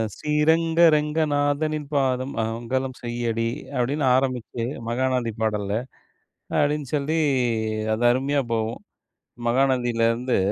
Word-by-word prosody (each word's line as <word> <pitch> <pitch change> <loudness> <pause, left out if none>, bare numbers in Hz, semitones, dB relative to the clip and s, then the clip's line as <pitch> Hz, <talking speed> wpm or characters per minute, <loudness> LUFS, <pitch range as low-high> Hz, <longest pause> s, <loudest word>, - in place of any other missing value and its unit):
ஸ்ரீரங்க 160 +2 +2
ரங்கநாதனின் 150 0 0
பாதம் 130 -1 +1
மங்கலம் 120 +4 -2
செய்யடி 120 -1 -1 0.3
அப்டின்னு 135 +4 0
ஆரமிச்சு, 125 -3 -1 0.3
மகாநதி 125 -1 0
பாடல்ல, 105 -2 -1 0.9
அப்டின்னு 145 -2 0
சொல்லி 150 +3 0 0.8
அது 120 +2 -2
அருமையா 140 +2 0
போகும். 110 0 0 0.8
மகாநதில 120 -2 +2
இருந்து, 125 +2 0
130 Hz, 90 wpm, -24 LUFS, 120-145 Hz, 0.9 s, ஸ்ரீரங்க